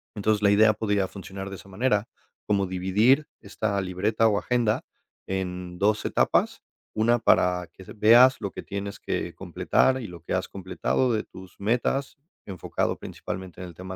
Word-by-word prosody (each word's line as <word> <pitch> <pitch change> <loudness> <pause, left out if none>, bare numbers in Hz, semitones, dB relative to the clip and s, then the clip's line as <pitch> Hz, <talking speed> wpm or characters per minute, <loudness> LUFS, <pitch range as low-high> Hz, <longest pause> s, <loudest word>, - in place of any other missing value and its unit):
entonces 105 0 +1
la 100 - +5
idea 110 +1 +5
podría 105 -3 0
funcionar 95 0 -8
de 95 - -7
esa 100 - -15
manera, 105 +1 0 0.4
como 100 -2 +1
dividir 105 +11 +2
esta 100 0 -2
libreta 105 +5 +1
o 105 -2 +2
agenda 120 -1 0 0.4
en 90 -2 -4
dos 105 +1 +1
etapas, - - +1 0.3
una 115 +2 +3
para 90 -5 +2
que 95 - -13
se - - -11
veas 120 +5 +6
lo 100 -3 -4
que - - -7
tienes 100 0 -5
que - - -3
completar 130 0 +1
y - - -6
lo 85 -3 -11
que - - -5
has - - -1
completado 100 +6 -1
de 110 -1 0
tus 95 0 -14
metas 125 +6 0 0.3
enfocado 95 -3 -2
principalmente 95 -1 -7
en 90 - -6
el 85 - -11
tema 95 +2 -8
100 Hz, 170 wpm, -26 LUFS, 95-110 Hz, 0.4 s, veas